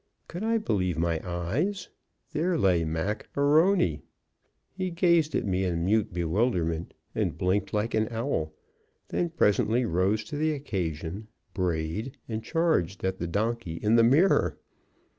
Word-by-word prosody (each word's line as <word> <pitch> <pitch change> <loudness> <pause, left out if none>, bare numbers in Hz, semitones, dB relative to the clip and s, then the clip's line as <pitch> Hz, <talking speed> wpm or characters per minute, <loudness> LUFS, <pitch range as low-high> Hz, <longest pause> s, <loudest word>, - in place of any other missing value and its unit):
Could 175 +4 -6
I 225 +1 +2
believe 95 - 0
my 85 -1 0
eyes? 115 - -2 0.4
There 170 +3 0
lay 90 - +3
Mac 80 +7 -3
A'Rony. 145 - +3 0.7
He 185 -1 -3
gazed 170 -3 +2
at - - 0
me 95 -1 0
in 85 -2 -1
mute 105 +2 +2
bewilderment 85 -1 -1 0.2
and - - -1
blinked 95 +3 0
like 105 +2 -1
an 110 0 +2
owl, 115 - -2 0.6
then 175 - 0
presently 120 -5 +2
rose 100 +3 +1
to 150 - -6
the 155 +1 +1
occasion, 95 - -4 0.3
brayed, 90 - -2
and 110 -1 -4
charged 160 - 0
at 95 0 -1
the 85 - -2
donkey 110 0 -1
in 105 +6 +2
the 115 - +6
mirror. 150 +11 +4
105 Hz, 140 wpm, -27 LUFS, 85-145 Hz, 0.7 s, the